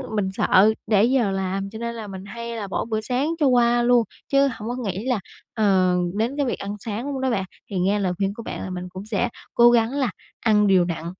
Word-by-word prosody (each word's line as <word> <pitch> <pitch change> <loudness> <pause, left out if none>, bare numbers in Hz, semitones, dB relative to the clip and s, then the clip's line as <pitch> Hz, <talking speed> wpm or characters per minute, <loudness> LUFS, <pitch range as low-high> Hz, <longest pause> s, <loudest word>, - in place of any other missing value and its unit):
mình 195 -3 0
sợ 200 +2 +4 0.2
trễ 205 -1 +5
giờ 240 -4 +2
làm 195 +1 -2
cho 220 +2 -9
nên 235 0 -4
là 220 -2 -6
mình 190 -1 -8
hay 235 +2 -6
là 210 -3 -4
bỏ 195 - -2
bữa 220 -1 -2
sáng 250 +7 -1
cho 300 - +3
qua 240 -1 +4
luôn, 245 -1 +4 0.3
chứ 275 0 +5
hổng 220 0 -7
có 245 - -2
nghĩ 210 -4 -4
là 250 -4 +1 0.3
ờ, 190 -5 +3 0.2
đến 235 +7 -1
cái 285 - +1
việc 245 - -2
ăn 200 +1 -4
sáng 230 +7 -4
luôn 265 -1 -3
đó 265 - +1
bạn. 205 -6 0 0.3
Thì 195 - -2
nghe 195 +3 +2
lời 185 -2 0
khuyên 195 +1 0
của 230 - -9
bạn - - -6
là - - -5
mình 180 0 -5
cũng 185 +2 -8
sẽ 220 +2 -1 0.2
cố 240 0 +6
gắng 230 -1 +3
là 265 -6 0 0.3
ăn 210 -2 +3
đều 185 -3 +4
đặn 165 -2 -4
215 Hz, 250 wpm, -23 LUFS, 195-240 Hz, 0.3 s, cố